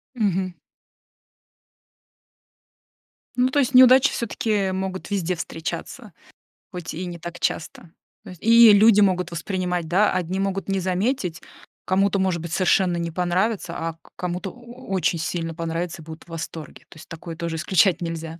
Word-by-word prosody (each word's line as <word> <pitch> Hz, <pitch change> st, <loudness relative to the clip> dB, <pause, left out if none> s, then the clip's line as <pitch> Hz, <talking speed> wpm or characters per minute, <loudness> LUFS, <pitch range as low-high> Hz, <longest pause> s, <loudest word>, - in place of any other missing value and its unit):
Мгм. 190 Hz, -5 st, 0 dB, 2.8 s
Ну, 250 Hz, 0 st, +3 dB
то 260 Hz, -, -1 dB
есть 275 Hz, 0 st, 0 dB
неудачи 260 Hz, +2 st, +7 dB
всё-таки 210 Hz, -4 st, -1 dB
могут 190 Hz, 0 st, -4 dB
везде 185 Hz, -3 st, -1 dB
встречаться, 165 Hz, +1 st, -6 dB, 0.6 s
хоть 180 Hz, -3 st, -6 dB
и 175 Hz, +4 st, -5 dB
не 175 Hz, -1 st, -7 dB
так 175 Hz, +1 st, -8 dB
часто. 165 Hz, +1 st, -3 dB, 0.3 s
То -, -, -11 dB
есть 180 Hz, -, -13 dB
и 230 Hz, 0 st, +8 dB
люди 210 Hz, 0 st, +6 dB
могут 180 Hz, -3 st, +2 dB
воспринимать, 180 Hz, 0 st, -2 dB
да, 195 Hz, +5 st, +3 dB
одни 185 Hz, +1 st, -2 dB
могут 195 Hz, 0 st, -2 dB
не 195 Hz, 0 st, +1 dB
заметить, 185 Hz, 0 st, -1 dB, 0.4 s
кому-то 195 Hz, +1 st, +2 dB
может 185 Hz, -3 st, 0 dB
быть 170 Hz, 0 st, -6 dB
совершенно 185 Hz, -1 st, +2 dB
не 170 Hz, -1 st, -3 dB
понравится, 180 Hz, +2 st, -1 dB
а 165 Hz, 0 st, -3 dB
к -, -, -21 dB
кому-то 180 Hz, +2 st, -4 dB
о 245 Hz, +1 st, -14 dB
очень 175 Hz, -2 st, +1 dB
сильно 165 Hz, 0 st, -3 dB
понравиться, 165 Hz, +1 st, -4 dB
и -, -, -14 dB
будут 160 Hz, 0 st, -10 dB
в -, -, -23 dB
восторге. 165 Hz, -1 st, -8 dB
То -, -, -15 dB
есть 155 Hz, -, -13 dB
такое 165 Hz, 0 st, -8 dB
тоже 165 Hz, 0 st, -4 dB
исключать 180 Hz, +1 st, +2 dB
нельзя. 165 Hz, -1 st, -5 dB
180 Hz, 155 wpm, -23 LUFS, 170-200 Hz, 2.8 s, и